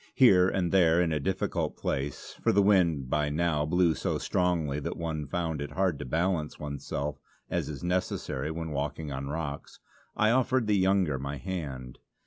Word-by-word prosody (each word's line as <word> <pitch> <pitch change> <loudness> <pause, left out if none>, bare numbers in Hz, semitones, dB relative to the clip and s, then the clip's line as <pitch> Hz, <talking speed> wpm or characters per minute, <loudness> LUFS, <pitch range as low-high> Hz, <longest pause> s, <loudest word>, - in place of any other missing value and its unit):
Here 95 -9 +6
and 90 -3 0
there 85 -3 +5
in 85 -2 +2
a 75 - 0
difficult 70 - -1
place, 70 +1 -3
for - - +3
the 100 +1 +4
wind 85 -9 +3
by 75 +2 +1
now 75 -1 0
blew 90 0 +3
so - - -1
strongly 85 -6 0
that - - -4
one 80 -3 -3
found 80 -1 -2
it 70 0 -5
hard 90 -4 +1
to - - -5
balance 80 +2 -1
oneself 70 -1 -4 0.3
as - - -1
is 75 +1 -7
necessary 90 -5 -1
when 80 0 -4
walking 75 +1 -3
on 65 +1 -4
rocks, 75 -1 -5 0.4
I 110 +1 +4
offered 130 0 +2
the 105 -1 +2
younger 95 -7 +2
my 70 +1 -4
hand. 70 -7 -5
80 Hz, 175 wpm, -29 LUFS, 70-90 Hz, 0.4 s, Here